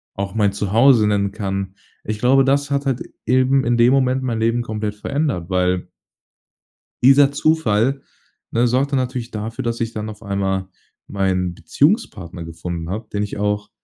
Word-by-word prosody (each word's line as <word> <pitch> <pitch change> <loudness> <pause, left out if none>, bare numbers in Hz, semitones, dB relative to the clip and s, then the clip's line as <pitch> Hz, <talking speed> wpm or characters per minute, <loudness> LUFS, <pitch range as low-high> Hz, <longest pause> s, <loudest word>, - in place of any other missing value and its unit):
auch 100 +2 -4
mein 105 -2 +2
Zuhause 110 +3 +4
nennen 100 -1 +1
kann. 95 -1 -4 0.3
Ich 105 0 -4
glaube, 135 +3 +4
das 140 +1 +1
hat 140 0 0
halt, 130 -2 -1 0.2
eben 130 +2 +3
in 120 0 +2
dem 120 +3 +5
Moment 130 -1 +2
mein 115 -3 -2
Leben 115 +2 +1
komplett 105 -2 -4
verändert, 120 - -2
weil 90 -1 0 1.2
dieser 135 +2 +6
Zufall, 135 -4 +1 0.5
ne, 120 +1 +2
sorgte 135 +3 +1
natürlich 125 -2 -2
dafür, 110 +2 -5
dass 115 0 -2
ich 115 0 -2
dann 110 0 -5
auf 105 +1 -12
einmal 95 -2 -2 0.4
meinen 95 -3 -1
Beziehungspartner 95 - -1
gefunden 85 +1 -6
habe, 110 +2 -5
den 105 - -1
ich 105 - -4
auch 105 0 -1
110 Hz, 160 wpm, -20 LUFS, 100-130 Hz, 1.2 s, dieser